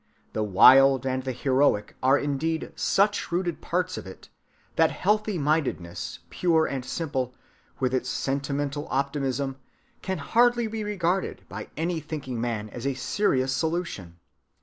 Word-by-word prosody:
The 110 - -1
wild 130 +6 +6
and 130 0 0
the 130 0 -3
heroic 130 -5 +1
are 135 +2 +5
indeed 145 +3 -2
such 205 -1 +1
rooted 175 -1 -1
parts 180 +1 -1
of - - -10
it 95 - -12 0.5
that - - +4
healthy‐mindedness 150 - -1
pure 165 -3 +2
and 135 -2 -3
simple, 130 -3 -3 0.4
with 130 -1 0
its 130 0 0
sentimental 140 +2 -2
optimism, 135 -1 -1 0.4
can 190 -1 -2
hardly 240 0 +3
be 220 0 -4
regarded 190 -3 -1
by - - -7
any 165 +1 -1
thinking 140 -6 -5
man 115 -3 -2
as 120 +2 -5
a 135 - -1
serious 130 -3 +1
solution. 160 - -3
140 Hz, 135 wpm, -26 LUFS, 130-170 Hz, 0.5 s, wild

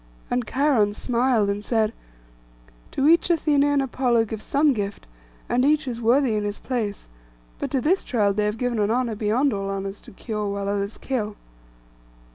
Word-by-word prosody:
And 245 -2 0
Cheiron 250 -6 +2
smiled, 240 -3 +1
and 200 +1 -2
said, 220 -1 +1 1.0
'To 275 - +1
each 335 +2 +5
Athené 300 -4 +3
and 285 -1 +2
Apollo 245 -3 +1
give 220 0 -6
some 285 +3 +2
gift, 205 -3 -4 0.4
and 250 - +1
each 295 0 +2
is 240 -2 -4
worthy 245 +1 +3
in 210 -1 0
his 205 0 -3
place; 220 -6 -3 0.5
but - - -3
to 270 - 0
this 365 +9 +2
child 205 -5 +1
they 210 0 +1
have 210 +1 -1
given 245 -1 -1
an 205 0 +2
honour 240 0 0
beyond 225 +6 +1
all 195 -1 -3
honours, 195 0 -4
to - - -14
cure 210 +1 -4
while 200 0 -3
others 200 +1 -2
kill. 215 -6 -3
230 Hz, 180 wpm, -24 LUFS, 205-265 Hz, 1.0 s, each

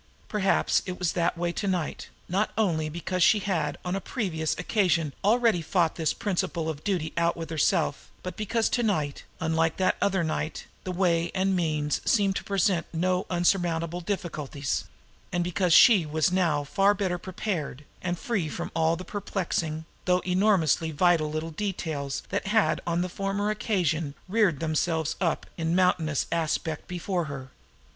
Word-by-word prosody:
Perhaps 200 -2 +2
it 180 0 -4
was 180 -3 0
that 170 0 0
way 175 0 0
to 200 +3 -3
night, 180 -5 -2 0.2
not 195 +4 +1
only 165 -8 +1
because 175 +3 -3
she 210 - +6
had 170 -8 -1
on 180 +1 -1
a 195 - -2
previous 170 - -2
occasion 175 -6 +1
already 220 -3 +3
fought 165 0 +1
this 160 -3 0
principle 185 -5 -2
of 155 -1 -5
duty 175 -6 -1
out 170 0 +2
with 165 0 -6
herself, 160 -1 +1
but 180 - -5
because 220 +2 0
to 245 - 0
night, 155 -11 -1
unlike 160 0 +1
that 185 - +2
other 195 -3 +2
night, 155 0 -3 0.2
the 185 - -2
way 175 -2 +1
and 190 +1 +2
the - - +1
means 155 -4 0
seemed 200 -3 +2
to - - -4
present 190 -3 +1
no 180 +2 0
insurmountable 175 -1 +1
difficulties, 155 -7 -3 0.5
and 175 0 0
because 180 +1 0
she 200 +1 +8
was 155 +3 +1
now 170 -6 +2
far 195 +7 +3
better 185 -3 -1
prepared, 170 -7 -4 0.2
and 175 -1 -2
free 190 -6 -1
from - - -5
all 165 0 +3
the 185 - -8
perplexing, 170 -6 -2 0.2
though 180 0 +3
enormously 180 -4 +2
vital, 160 0 +3
little 155 +2 -3
details 155 -7 -3
that 200 +1 -2
had 205 -6 +2
on 170 0 +1
the 180 - 0
former 195 +3 -1
occasion 165 -9 -1
reared 190 -7 +2
themselves 160 0 0
up 165 -3 0
in 165 0 0
mountainous 170 -5 +2
aspect 160 -1 -1
before 180 0 -2
her. 135 -3 -7
175 Hz, 165 wpm, -27 LUFS, 160-190 Hz, 0.5 s, she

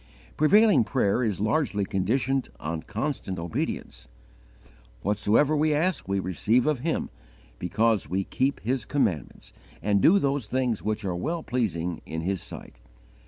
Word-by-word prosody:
Prevailing 200 - +5
prayer 120 -1 +1
is 105 -5 -1
largely 105 -2 +1
conditioned 125 +8 0
on 80 +1 -3
constant 110 - -3
obedience. 80 -7 -4 1.0
"Whatsoever 105 +9 +2
we 150 0 +2
ask 165 - 0
we 100 0 0
receive 105 +7 +1
of 150 -4 +1
Him, 160 +5 -2 0.5
because 105 -1 +1
we 95 +3 0
keep 135 +7 -1
His 125 +3 -1
commandments, 95 - -2 0.3
and 100 -1 +1
do 185 - +6
those 140 - 0
things 125 -2 0
which 105 0 -2
are 90 -2 -1
well 160 - -2
pleasing 90 -9 -2
in 80 0 -4
His 95 +1 -2
sight." - - -10
110 Hz, 140 wpm, -26 LUFS, 95-140 Hz, 1.0 s, do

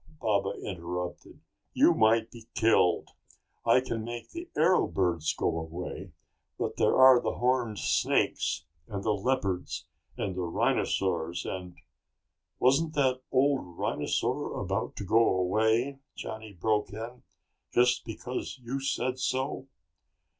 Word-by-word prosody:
Baba 100 -3 +1
interrupted. 90 -1 -5 0.3
"You - - +5
might 110 +1 +3
be 115 -1 -13
killed. 110 -6 +3 0.5
I 120 +2 +5
can 115 -3 -3
make 120 +1 -7
the 340 0 -7
arrow 170 +4 +4
birds 85 -4 0
go 80 - 0
away, 90 +3 -6 0.5
but - - -3
there - - +3
are 130 -2 +8
the - - -2
horned 125 -3 +1
snakes 80 - +1 0.2
and 100 -1 -5
the 110 - +2
leopards 100 -4 -1 0.3
and 95 -3 -2 0.2
rhinosaurs 85 -2 0
and...." 90 -2 -5 0.8
"Wasn't 145 +5 +2
that 130 -3 +2
old 135 +1 +3
rhinosaur - - -1
about - - -2
to - - -5
go 110 +4 +4
away?" 110 +8 +1 0.2
Johnny 110 -1 -7
broke 105 +3 0
in. 115 +4 -7 0.5
"Just 125 +1 +3
because 120 +4 -5
you 125 +2 -4
said 130 -1 -1
so?" 130 +1 -2
115 Hz, 125 wpm, -29 LUFS, 95-130 Hz, 0.8 s, are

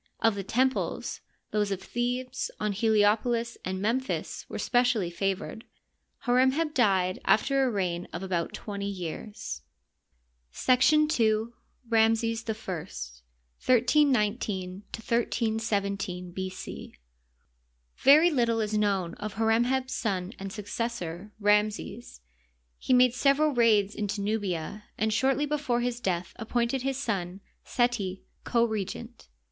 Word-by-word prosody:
Of 225 - +3
the 200 -1 -4
temples, 260 +6 -1 0.3
those 210 -1 +1
of 195 -2 -2
Thebes, 250 +4 -2
On 210 0 0
Heliopolis, 220 +3 +2
and 185 0 -3
Memphis 240 +6 -2
were - - -5
specially 245 -7 +2
favored. 195 +5 -3 0.6
Hor 245 0 +2
em 260 0 +4
heb 310 0 -1
died 190 -7 +2
aifter 275 +4 +3
a 260 - +2
reign 180 -5 -2
of 170 - -5
about 175 -3 -1
twenty 200 -2 -5
years. 180 - -6 0.9
§ 300 - +4
2. 225 -5 +1 0.3
Ramses 225 0 +2
I - - +2
(1J19 185 - -1
1317 205 -5 -1
B. 190 +1 -3
C). 185 - -8 1.0
Very 310 +5 +6
little 235 -5 +2
is 215 -1 -1
known 195 -5 +1
of 210 -1 -6
Hor 225 +1 +1
em 230 +2 +4
heb 260 +1 0
's - - -2
son 195 -3 -2
and 195 0 -5
succes 225 +3 -3
sor, 175 +1 -6
Ramses. 210 - 0 0.6
He - - -3
made 250 -1 +6
several 280 +3 +3
raids 215 -4 +4
into 205 -1 -3
Nubia, 205 -2 -2
and 220 0 +1
shortly 270 +5 +2
before 285 -5 0
his 245 0 -2
death 180 -6 -2
appointed 240 +2 -1
his 270 0 -1
son, 195 -8 -2 0.2
Seti, 235 -7 -1 0.2
co 235 -1 +2
regent. 200 - -5
220 Hz, 130 wpm, -28 LUFS, 195-245 Hz, 1.0 s, Very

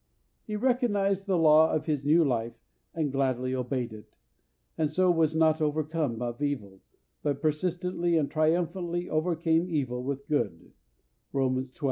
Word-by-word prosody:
He 215 - -3
recognised 205 -5 +1
the 190 -2 +2
law 160 -1 +6
of 155 -1 -1
his 150 -4 -1
new 160 +3 +4
life 120 -3 -1 0.4
and 155 -4 -1
gladly 130 -2 0
obeyed 125 -2 -2
it, 105 -1 -13 0.6
and 155 -2 0
so 180 +4 +3
was 160 -2 +2
not 160 0 +3
overcome 150 -5 -1
of 120 +3 -5
evil, 105 -10 -3 0.4
but 145 -2 -1
persistently 175 +2 0
and 150 -3 +1
triumphantly 175 +2 0
overcame 165 +1 +1
evil 130 -6 -1
with 140 +1 -4
good 115 - -2 0.6
(Romans 130 -1 0
xii. - - -25
155 Hz, 145 wpm, -28 LUFS, 130-170 Hz, 0.6 s, law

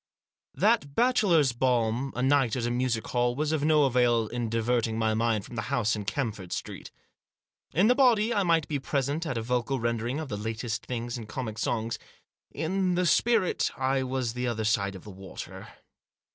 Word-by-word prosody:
That 205 -11 +2
bachelor's 200 - +3
balm, 120 +1 0
a 125 - -1
night 135 -4 +3
at 120 -2 -2
a 120 - -1
music 120 -2 -1
hall, 120 0 0
was 150 +2 -1
of 155 -2 0
no 155 -1 +4
avail 120 -4 +3
in 120 -2 -3
diverting 115 0 0
my 110 -1 +1
mind 110 -2 0
from 120 - -10
the 110 - -1
house 110 -1 +1
in 105 -1 -5
Camford 105 -5 -3
Street. - - -5 0.9
In 180 +6 +4
the 245 - +6
body 240 -4 +3
I 205 - +2
might 165 -4 +2
be 145 -2 -2
present 140 +4 -1
at 130 - -2
a 115 - -2
vocal 125 +2 -1
rendering 115 +4 -1
of 160 - -4
the 105 -5 -4
latest 110 +1 -4
things 120 0 -4
in 110 - -8
comic 110 -1 -5
songs; 115 +1 -1 0.5
in 185 +2 -1
the 180 +1 +1
spirit 210 +3 +2
I 135 0 +1
was 130 -3 -2
the 125 0 -2
other 110 -2 -2
side 100 -3 +1
of 95 - -10
the 105 - -10
water. 95 0 -9
125 Hz, 190 wpm, -28 LUFS, 115-150 Hz, 0.9 s, the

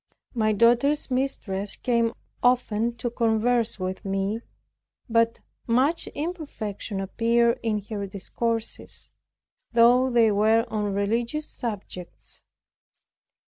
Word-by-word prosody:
My 215 -3 +2
daughter's 240 +7 +3
mistress 215 -7 -1
came 235 -2 +1 0.3
often 235 -2 +2
to 240 0 -3
converse 230 -1 +1
with 185 +2 -4
me, 195 +3 -1 0.7
but 230 0 +2 0.3
much 265 +8 +2
imperfection 285 - -4
appeared 235 +4 +2
in 220 -2 0
her 205 -2 -4
discourses, 225 +4 -4 0.6
though 245 +2 +5
they 235 -3 +4
were 220 +3 +3
on 210 -2 -1
religious 235 +9 -1
subjects. 195 -6 -7
230 Hz, 100 wpm, -25 LUFS, 210-240 Hz, 0.7 s, though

